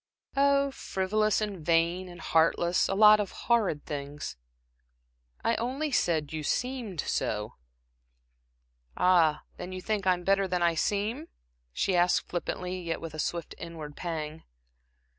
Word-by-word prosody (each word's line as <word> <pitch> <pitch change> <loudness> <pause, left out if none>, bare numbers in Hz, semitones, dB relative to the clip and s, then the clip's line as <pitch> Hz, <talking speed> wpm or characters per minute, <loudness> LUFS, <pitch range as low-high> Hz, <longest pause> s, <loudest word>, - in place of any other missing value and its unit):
"Oh 280 0 +3
frivolous, 215 -1 0
and 200 -6 -4
vain, 170 +3 +1
and 175 -1 -11
heartless. 165 +2 +2
A 195 - 0
lot 210 +1 +8
of 205 -2 -1 0.2
horrid 215 -11 +2
things." 145 - -5 1.1
"I 230 - +2
only 270 +6 -2
said 160 - +1
you 155 - -3
seemed 230 - -2
so." 105 0 -2 1.4
"Ah, 165 -4 +4
then 180 +1 -6
you 185 - -5
think 200 0 -2
I'm 180 -1 +2
better 195 +1 +2
than 180 -1 0
I 170 -1 +4
seem?" 210 - -1 0.4
she 185 - 0
asked, 175 0 +3
flippantly, 180 +1 -3
yet 165 -1 -3
with 165 -2 -7
a 155 - -7
swift 170 +1 -3
inward 160 -3 -8
pang. 160 -2 -4
180 Hz, 140 wpm, -29 LUFS, 165-210 Hz, 1.4 s, lot